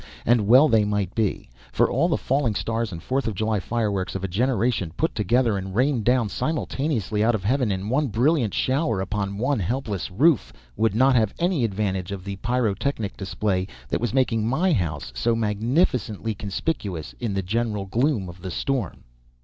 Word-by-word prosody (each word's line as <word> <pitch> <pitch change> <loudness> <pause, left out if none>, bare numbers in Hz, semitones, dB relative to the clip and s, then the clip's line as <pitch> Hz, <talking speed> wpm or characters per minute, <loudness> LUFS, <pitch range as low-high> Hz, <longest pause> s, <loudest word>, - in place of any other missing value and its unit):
And 115 -3 +3
well 130 +7 +7
they 110 -5 +4
might 105 -2 -1
be, 110 -4 -1 0.2
for - - +3
all - - +1
the - - +1
falling 130 -5 0
stars 115 0 -1
and 85 -2 -7
Fourth 135 0 -1
of 110 - -2
July 110 +1 0
fireworks 100 -3 -2
of 95 - -4
a - - 0
generation, 115 -2 0
put 160 - 0
together 115 -1 +1
and 95 0 -6
rained 125 -2 +1
down 125 -2 +3
simultaneously 135 - -1
out 115 +1 +3
of 100 - -4
heaven 125 +1 +1
in 95 +1 -3
one 140 +6 +1
brilliant 120 +1 +2
shower 135 - +1
upon 100 0 -2
one 130 +3 0
helpless 105 - -2
roof, 130 - +3 0.2
would 110 -2 +1
not 130 +3 +4
have 110 -4 +2
any 170 -6 +1
advantage 95 -4 -1
of 95 -2 -5
the 100 0 -5
pyrotechnic 120 0 -1
display 95 -1 -1 0.2
that - - -1
was 120 -3 0
making 115 -5 +1
my 170 +9 +2
house 80 - -2
so 85 - +1
magnificently 115 - 0
conspicuous 100 - -4
in 115 -5 -2
the 95 - -1
general 105 +1 -1
gloom 115 0 0
of 90 0 -11
the 95 - -5
storm. 120 0 -2
110 Hz, 180 wpm, -24 LUFS, 100-125 Hz, 0.2 s, well